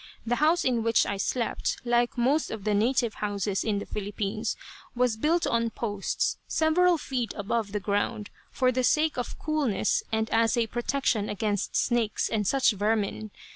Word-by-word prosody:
The 240 Hz, +1 st, 0 dB
house 320 Hz, +4 st, +3 dB
in 245 Hz, -3 st, +2 dB
which 230 Hz, 0 st, +3 dB
I 200 Hz, -, -2 dB
slept, 235 Hz, +4 st, -1 dB
like 240 Hz, 0 st, +1 dB
most 270 Hz, +6 st, +2 dB
of 215 Hz, -3 st, -6 dB
the 210 Hz, 0 st, +1 dB
native 235 Hz, +2 st, +2 dB
houses 205 Hz, -1 st, -1 dB
in 215 Hz, -2 st, 0 dB
the 200 Hz, -, -4 dB
Philippines, 210 Hz, +2 st, -3 dB, 0.4 s
was 245 Hz, -2 st, +2 dB
built 320 Hz, +9 st, +1 dB
on 230 Hz, 0 st, +1 dB
posts, 205 Hz, -3 st, -2 dB
several 340 Hz, +2 st, +3 dB
feet 255 Hz, -6 st, -3 dB
above 205 Hz, +1 st, -2 dB
the 210 Hz, -, -1 dB
ground, 205 Hz, +1 st, -2 dB, 0.2 s
for 255 Hz, -1 st, +1 dB
the 255 Hz, 0 st, 0 dB
sake 305 Hz, +4 st, +2 dB
of 245 Hz, -, -4 dB
coolness 290 Hz, -11 st, 0 dB
and 220 Hz, 0 st, 0 dB
as 225 Hz, +1 st, +3 dB
a 235 Hz, -, +3 dB
protection 240 Hz, -2 st, -1 dB
against 205 Hz, -1 st, -2 dB
snakes 235 Hz, -4 st, +1 dB
and 210 Hz, -3 st, -1 dB
such 265 Hz, +1 st, +3 dB
vermin. 215 Hz, +1 st, -1 dB
230 Hz, 170 wpm, -27 LUFS, 210-255 Hz, 0.4 s, house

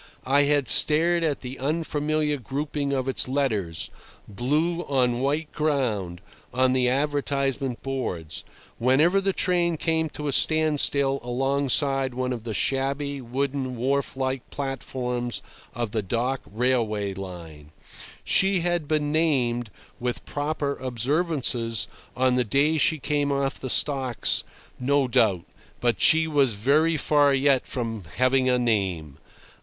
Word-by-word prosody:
I 140 Hz, +2 st, +3 dB
had 145 Hz, -2 st, +1 dB
stared 170 Hz, +3 st, +4 dB
at 150 Hz, -3 st, -1 dB
the 130 Hz, +1 st, -7 dB
unfamiliar 150 Hz, 0 st, -1 dB
grouping 140 Hz, +2 st, -3 dB
of 130 Hz, -1 st, -1 dB
its 135 Hz, -, +2 dB
letters, 110 Hz, -, -2 dB, 0.4 s
blue 150 Hz, -, -1 dB
on 125 Hz, -3 st, +1 dB
white 150 Hz, +3 st, -1 dB
ground, 115 Hz, -, -1 dB, 0.3 s
on 130 Hz, 0 st, +2 dB
the 125 Hz, -1 st, +2 dB
advertisement 140 Hz, -2 st, -1 dB
boards, 90 Hz, -, -4 dB, 0.4 s
whenever 150 Hz, +11 st, +3 dB
the 195 Hz, 0 st, +1 dB
train 175 Hz, -3 st, +1 dB
came 160 Hz, 0 st, 0 dB
to 150 Hz, 0 st, -6 dB
a -, -, 0 dB
standstill 145 Hz, -3 st, +4 dB
alongside 135 Hz, +1 st, 0 dB
one 130 Hz, 0 st, -2 dB
of 115 Hz, -2 st, -7 dB
the 110 Hz, -, -4 dB
shabby, 140 Hz, +3 st, -1 dB
wooden, 130 Hz, +1 st, -3 dB
wharf 135 Hz, +2 st, -1 dB
like 130 Hz, -1 st, -3 dB
platforms 125 Hz, -3 st, -4 dB, 0.3 s
of 120 Hz, -3 st, -3 dB
the 110 Hz, -, -1 dB
dock 120 Hz, +6 st, -2 dB
railway 110 Hz, -4 st, 0 dB
line. 85 Hz, -6 st, -9 dB, 0.5 s
She 190 Hz, -2 st, +3 dB
had 175 Hz, -3 st, -1 dB
been 150 Hz, -1 st, 0 dB
named, 125 Hz, -8 st, 0 dB, 0.3 s
with 125 Hz, 0 st, -4 dB
proper 145 Hz, -1 st, -3 dB
observances, 125 Hz, -4 st, 0 dB, 0.3 s
on 130 Hz, 0 st, +3 dB
the 125 Hz, 0 st, +2 dB
day 145 Hz, +7 st, +1 dB
she 160 Hz, -, +3 dB
came 145 Hz, 0 st, -1 dB
off 140 Hz, -1 st, -1 dB
the 130 Hz, -, -5 dB
stocks, 130 Hz, -3 st, +2 dB, 0.4 s
no 140 Hz, +1 st, +1 dB
doubt, 100 Hz, -7 st, +2 dB, 0.3 s
but 120 Hz, -3 st, 0 dB
she 160 Hz, 0 st, +5 dB
was 140 Hz, -6 st, +2 dB
very 150 Hz, +9 st, +2 dB
far 145 Hz, -1 st, +3 dB
yet 135 Hz, -1 st, +2 dB
from 115 Hz, -6 st, -4 dB
"having 130 Hz, +1 st, +2 dB
a 125 Hz, -, +3 dB
name." 95 Hz, -, -1 dB
135 Hz, 135 wpm, -25 LUFS, 120-145 Hz, 0.5 s, she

